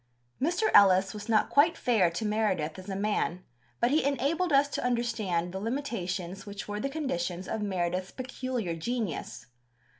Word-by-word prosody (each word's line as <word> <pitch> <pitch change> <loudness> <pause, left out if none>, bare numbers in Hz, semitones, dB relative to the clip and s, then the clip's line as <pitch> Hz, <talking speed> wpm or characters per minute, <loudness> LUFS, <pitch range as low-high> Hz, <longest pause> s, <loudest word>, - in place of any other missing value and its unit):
Mr. 350 +9 +1
Ellis 190 -1 +6
was 210 +1 -8
not 215 -2 +3
quite 305 +4 +4
fair 215 -8 +3
to 175 +7 -4
Meredith 200 -7 0
as 185 +2 -10
a 195 - -3
man, 195 -3 -1 0.4
but 240 - +2
he 310 - +3
enabled 290 +6 0
us 280 0 +5
to - - -3
understand 215 -8 0
the 190 - -3
limitations 195 -6 -3
which 200 0 -7
were 205 0 -3
the 275 - -2
conditions 185 - -3
of 220 - -3
Meredith's 185 -2 -1
peculiar 255 -7 -4
genius. 210 - -4
210 Hz, 160 wpm, -29 LUFS, 185-255 Hz, 0.4 s, Ellis